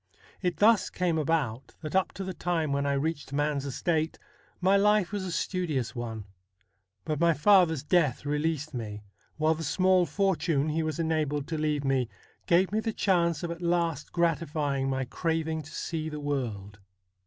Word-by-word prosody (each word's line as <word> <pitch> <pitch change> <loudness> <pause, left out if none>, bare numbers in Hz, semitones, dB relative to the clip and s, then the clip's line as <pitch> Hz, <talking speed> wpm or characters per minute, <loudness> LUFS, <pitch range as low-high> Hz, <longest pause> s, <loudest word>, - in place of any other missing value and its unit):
It 180 -2 -1
thus 215 0 +4
came 175 -3 0
about 140 -6 -1
that 155 0 -5
up 190 - +2
to 195 - -5
the 190 0 -4
time 165 -3 -1
when 140 0 0
I 140 - +2
reached 145 0 -2
man's 145 -1 0
estate 160 +3 -1 0.4
my 190 +2 +4
life 205 -2 +3
was 205 -2 -2
a 185 - -4
studious 165 - -1
one. 115 -3 -5 0.8
But 155 -2 -2
my 170 -1 +4
father's 160 -3 +4
death 150 -5 +2
released 150 +1 -1
me, 105 -4 -5 0.3
while 155 +1 +3
the 165 +1 -5
small 185 +3 +3
fortune 165 -3 +1
he 160 +2 0
was 155 0 -2
enabled 155 -3 0
to 160 - -2
leave 150 -2 0
me 135 -3 +1 0.4
gave 180 +2 +4
me 215 - +1
the 225 0 -2
chance 170 -6 +1
of 170 - -2
at 170 +1 -7
last 170 -4 0
gratifying 150 -5 0
my 130 -1 -1
craving 160 +3 -1
to 150 +1 -12
see 160 -1 -3
the 150 -1 -6
world. 115 -9 -3
160 Hz, 175 wpm, -28 LUFS, 140-175 Hz, 0.8 s, thus